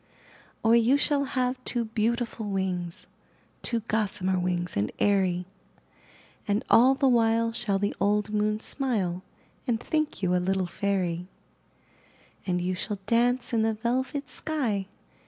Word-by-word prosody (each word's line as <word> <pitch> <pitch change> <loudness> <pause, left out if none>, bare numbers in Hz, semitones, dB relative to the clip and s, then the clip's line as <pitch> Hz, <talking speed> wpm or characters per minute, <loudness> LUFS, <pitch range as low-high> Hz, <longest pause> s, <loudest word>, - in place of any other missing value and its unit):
IN - - -35
THE - - -33
NURSERY - - -27
Or, - - +7
you 240 +4 +4
shall 285 0 +2
have 255 -1 -1
two 240 -2 0
beautiful 225 0 -1
wings 185 -3 -3 0.3
— - - -36
Two 235 -2 -1
gossamer 205 -4 0
wings 180 -1 -1
and 100 +1 0
airy, 185 -3 +2 1.0
And 205 +2 +1
all 255 +3 +7
the 270 0 +2
while 230 -2 +3
shall 200 -3 0
the 205 +1 -1
old 210 +1 +1
moon 210 0 +1
smile 205 -12 -1 0.5
And 230 -2 +1
think 305 -5 -2
you 180 -1 +2
a - - +4
little 190 +1 0
fairy; 180 -1 -1 1.2
And 180 -1 +1
you 180 +1 -1
shall 205 +3 -3
dance 240 +3 +1
in 225 - +3
the 220 0 +1
velvet 260 +5 -2
sky. 235 -12 -1
215 Hz, 155 wpm, -27 LUFS, 190-240 Hz, 1.2 s, Or